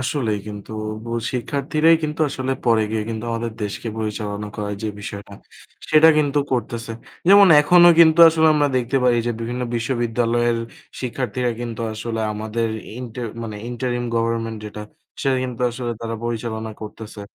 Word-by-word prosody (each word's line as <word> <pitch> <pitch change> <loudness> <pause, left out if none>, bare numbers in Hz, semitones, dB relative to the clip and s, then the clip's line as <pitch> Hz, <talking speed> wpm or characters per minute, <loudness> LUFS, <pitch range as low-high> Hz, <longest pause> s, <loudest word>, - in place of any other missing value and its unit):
আসলেই 125 -5 -1
কিন্তু 105 +1 -8 0.3
বু 115 - -7 0.2
শিক্ষার্থীরাই 150 +6 +2
কিন্তু 150 +1 -3
আসলে 130 -1 -2
পরে 115 -2 +4
গিয়ে 110 -1 -1
কিন্তু 110 +1 -4
আমাদের 115 0 -3
দেশকে 105 +3 -5
পরিচালনা 105 -1 -4
করার 105 -1 -3
যে 110 - -1
বিষয়টা, 100 -1 -8 0.6
সেটা 155 +1 +7
কিন্তু 145 -1 +1
করতেছে। 115 -2 -3 0.4
যেমন 200 -1 +8
এখনও 175 +3 +7
কিন্তু 165 0 +6
আসলে 160 0 +3
আমরা 145 -1 +2
দেখতে 125 +2 0
পারি 120 -1 +4
যে 120 - +1
বিভিন্ন 120 +2 -3
বিশ্ববিদ্যালয়ের 120 0 0 0.4
শিক্ষার্থীরা 125 -1 -2
কিন্তু 115 -1 -5
আসলে 115 +1 -4
আমাদের 110 +2 -2 0.3
ইন্টার 120 -1 -6 0.2
মানে 110 -2 -6
ইন্টারিম 120 0 -2
গভর্নমেন্ট 115 -1 -1
যেটা, 105 0 -7 0.4
সেটা 135 -1 +1
কিন্তু 125 -2 -6
আসলে 120 0 -4
তারা 115 0 -4
পরিচালনা 110 -1 -3
করতেছে। 105 0 -9
120 Hz, 150 wpm, -21 LUFS, 110-130 Hz, 0.6 s, যেমন